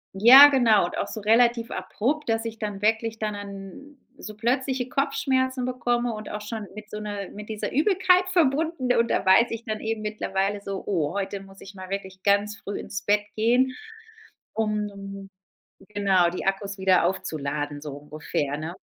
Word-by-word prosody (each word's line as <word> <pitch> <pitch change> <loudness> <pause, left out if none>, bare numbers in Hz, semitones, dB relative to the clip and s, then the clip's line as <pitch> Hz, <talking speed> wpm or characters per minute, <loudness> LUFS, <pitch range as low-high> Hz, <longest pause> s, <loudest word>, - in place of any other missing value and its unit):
Ja, 260 +8 +10
genau 230 -9 +4
und - - -6
auch - - -2
so 215 - -7
relativ 230 +2 +3
abrupt, 290 +7 -2
dass 225 0 0
ich 225 -1 -6
dann 205 -2 -4
wirklich 225 +1 0
dann 215 -1 -3
an 200 +7 -9 0.2
so 215 0 -9
plötzliche 255 +2 -1
Kopfschmerzen 260 -2 0
bekomme 245 -1 -1
und 215 0 -7
auch 210 - -5
schon 210 -1 -6
mit 215 0 -10
so 210 - -6
'ner 205 -2 -5
mit 210 0 -10
dieser 215 -1 -4
Übelkeit 365 +3 +3
verbunden. 315 -5 +1
Und 235 -1 +2
da - - 0
weiß 190 +6 +6
ich 230 0 -5
dann 215 -3 -4
eben 225 0 -3
mittlerweile 205 -1 -2
so: 195 -1 -5
„Oh, 165 -6 -1
heute 200 0 -3
muss 195 0 -15
ich 195 +1 -12
mal 185 -1 -9
wirklich 190 -1 -6
ganz 205 +1 +2
früh 200 - -6
ins 195 - -6
Bett 205 0 +3 0.2
gehen, 245 +4 +2 0.8
um, 200 -2 -4 0.6
genau, 195 -4 +2
die 180 - -6
Akkus 195 +1 -2
wieder 185 -2 +3
aufzuladen.“ 150 -5 -3
So 150 -1 -7
ungefähr, 145 0 -4
ne? 160 +3 -5
210 Hz, 175 wpm, -25 LUFS, 195-240 Hz, 0.8 s, Ja